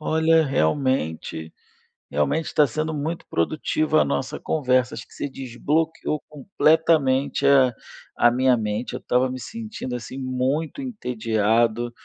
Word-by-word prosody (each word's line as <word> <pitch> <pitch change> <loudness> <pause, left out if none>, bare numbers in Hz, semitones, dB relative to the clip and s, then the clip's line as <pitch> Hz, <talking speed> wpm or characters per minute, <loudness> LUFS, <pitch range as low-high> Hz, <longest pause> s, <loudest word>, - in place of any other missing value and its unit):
Olha, 160 +1 +3
realmente 80 - -1 0.6
realmente 145 - -1
tá 150 - +5
sendo 155 +5 -3
muito 155 +3 -3
produtiva 155 - +1
a - - +1
nossa 135 +3 -2
conversa, 130 -4 +1
acho - - -8
que - - -18
você 145 - -4
desbloqueou 150 +5 -2
completamente 150 -3 +2
a 135 -3 +5 0.5
a 120 - +6
minha 130 +1 +3
mente, 110 +1 -2
eu - - -4
estava 125 +1 +1
me 130 0 -6
sentindo, 215 - -6
assim, 125 +2 -8
muito 135 - -2
entediado, 115 - 0
130 Hz, 130 wpm, -23 LUFS, 120-155 Hz, 0.6 s, a